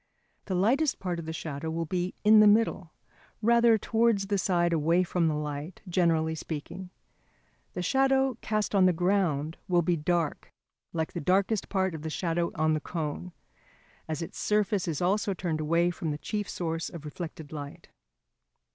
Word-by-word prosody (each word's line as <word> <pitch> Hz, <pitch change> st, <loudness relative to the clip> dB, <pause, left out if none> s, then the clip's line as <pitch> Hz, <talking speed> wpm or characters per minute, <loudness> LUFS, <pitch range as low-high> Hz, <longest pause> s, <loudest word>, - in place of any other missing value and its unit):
The 190 Hz, -, -2 dB
lightest 255 Hz, -, +2 dB
part 180 Hz, -2 st, -3 dB
of 165 Hz, -, -7 dB
the -, -, -3 dB
shadow 160 Hz, -1 st, -5 dB
will 165 Hz, +1 st, -2 dB
be 180 Hz, +2 st, -2 dB
in 215 Hz, +1 st, +7 dB
the 215 Hz, -, +7 dB
middle, 205 Hz, -5 st, +3 dB, 0.5 s
rather 235 Hz, 0 st, +5 dB
towards 225 Hz, -2 st, +1 dB
the 200 Hz, 0 st, 0 dB
side 175 Hz, -2 st, +1 dB
away 165 Hz, +3 st, +3 dB
from 175 Hz, -1 st, 0 dB
the 155 Hz, -, 0 dB
light, 150 Hz, +3 st, -5 dB
generally 165 Hz, -3 st, +2 dB
speaking. 160 Hz, +4 st, -6 dB, 0.8 s
The 180 Hz, -, -3 dB
shadow 265 Hz, +3 st, +2 dB
cast 215 Hz, -1 st, -1 dB
on 190 Hz, -2 st, +5 dB
the 180 Hz, -, +3 dB
ground 170 Hz, -4 st, 0 dB
will 175 Hz, -2 st, +3 dB
be 175 Hz, +1 st, +2 dB
dark, 165 Hz, 0 st, -1 dB, 0.4 s
like 160 Hz, -1 st, -3 dB
the 175 Hz, -, -4 dB
darkest 195 Hz, +5 st, +1 dB
part 190 Hz, -2 st, 0 dB
of 160 Hz, -, -6 dB
the 160 Hz, -, -4 dB
shadow 170 Hz, +1 st, -1 dB
on 155 Hz, 0 st, +2 dB
the 155 Hz, -, 0 dB
cone, 160 Hz, +2 st, -4 dB, 0.8 s
as 160 Hz, +1 st, -3 dB
its -, -, -8 dB
surface 210 Hz, -2 st, +1 dB
is 165 Hz, 0 st, -2 dB
also 200 Hz, +2 st, +1 dB
turned 165 Hz, -3 st, -2 dB
away 170 Hz, +3 st, +2 dB
from 165 Hz, -2 st, -4 dB
the 150 Hz, -, -2 dB
chief 205 Hz, +6 st, -4 dB
source 165 Hz, -1 st, -3 dB
of 160 Hz, -3 st, -9 dB
reflected 160 Hz, -1 st, -7 dB
light. 145 Hz, -2 st, -8 dB
175 Hz, 175 wpm, -28 LUFS, 160-200 Hz, 0.8 s, in